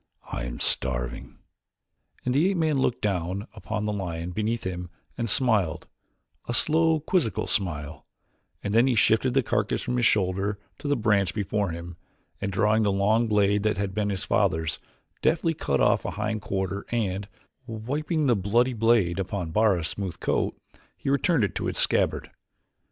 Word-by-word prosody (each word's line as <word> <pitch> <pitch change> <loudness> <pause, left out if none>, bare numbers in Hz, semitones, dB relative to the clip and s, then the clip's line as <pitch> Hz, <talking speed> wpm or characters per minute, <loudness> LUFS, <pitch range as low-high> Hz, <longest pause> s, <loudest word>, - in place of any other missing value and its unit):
I - - -3
am - - -6
starving," - - -1 0.9
and 125 - +1
the 155 +8 +3
ape 195 - 0
man 155 -4 +1
looked 125 -2 0
down 95 +1 -1
upon 105 -1 -4
the 105 - -1
lion 85 -3 -4
beneath 110 +4 -1
him 90 -1 -4 0.3
and 115 -2 -2
smiled, 110 -9 +2 0.6
a 120 - -1
slow 160 +2 +3
quizzical 160 - 0
smile, 75 -7 -2 0.6
and 100 - -2
then 115 +3 +5
he 130 - +2
shifted 115 +4 +3
the 135 - +4
carcass 105 -2 0
from 125 -1 -1
his 120 - +2
shoulder 95 +1 +1 0.2
to - - -5
the 145 - +2
branch 105 -5 +1
before 105 -1 -1
him 85 +1 -7 0.4
and, 100 -1 -2
drawing 105 +3 +2
the 105 -2 +2
long 105 +4 +2
blade 105 -1 +3
that 105 +1 0
had 100 -1 -2
been 105 0 0
his 95 -2 -3
father's, 80 0 +1 0.4
deftly 165 +1 +2
cut 70 - -1
off - - +3
a - - -2
hind 105 +1 -3
quarter 95 0 -2
and, 100 -4 -1 0.4
wiping 145 +8 -2
the 125 -3 +4
bloody 115 +6 +2
blade 115 -6 +2
upon 95 -3 -3
Bara's 95 -4 +2
smooth 95 -4 -5
coat, - - 0 0.4
he 135 - -2
returned 140 - +2
it 100 - 0
to - - -2
its - - -3
scabbard. - - +2
105 Hz, 170 wpm, -26 LUFS, 95-120 Hz, 0.9 s, then